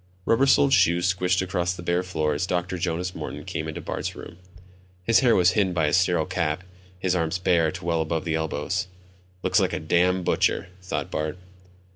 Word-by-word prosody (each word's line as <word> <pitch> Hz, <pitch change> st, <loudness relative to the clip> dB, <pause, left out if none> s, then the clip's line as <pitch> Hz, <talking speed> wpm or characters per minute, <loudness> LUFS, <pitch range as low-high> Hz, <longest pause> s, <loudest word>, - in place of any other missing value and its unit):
Rubber 125 Hz, +4 st, +3 dB
soled 135 Hz, 0 st, +4 dB
shoes 90 Hz, 0 st, +3 dB
squished 90 Hz, 0 st, +1 dB
across 90 Hz, -1 st, -1 dB
the 85 Hz, -, -9 dB
bare 85 Hz, +1 st, +1 dB
floor 80 Hz, -5 st, -1 dB
as 75 Hz, +5 st, -2 dB
Dr. 90 Hz, 0 st, -2 dB
Jonas 90 Hz, +1 st, -2 dB
Morton -, -, -6 dB
came 80 Hz, -, -4 dB
into 80 Hz, +2 st, -5 dB
Bart's -, -, -4 dB
room. 85 Hz, -, -10 dB, 0.7 s
His 115 Hz, +4 st, +4 dB
hair 125 Hz, -3 st, +4 dB
was 90 Hz, 0 st, +4 dB
hidden 95 Hz, -2 st, +1 dB
by 80 Hz, -3 st, +1 dB
a 75 Hz, -, 0 dB
sterile 90 Hz, -3 st, +3 dB
cap, 80 Hz, 0 st, -2 dB, 0.3 s
his 90 Hz, 0 st, 0 dB
arms 85 Hz, 0 st, 0 dB
bare 85 Hz, -3 st, +2 dB
to -, -, -8 dB
well 85 Hz, -1 st, +1 dB
above 80 Hz, +2 st, -2 dB
the 80 Hz, -, -1 dB
elbows. 80 Hz, +3 st, -2 dB, 0.6 s
Looks -, -, +3 dB
like -, -, 0 dB
a -, -, -1 dB
damned 90 Hz, +3 st, +1 dB
butcher, -, -, +1 dB
thought 90 Hz, -, -4 dB
Bart. 75 Hz, +3 st, -3 dB
90 Hz, 195 wpm, -25 LUFS, 80-90 Hz, 0.7 s, soled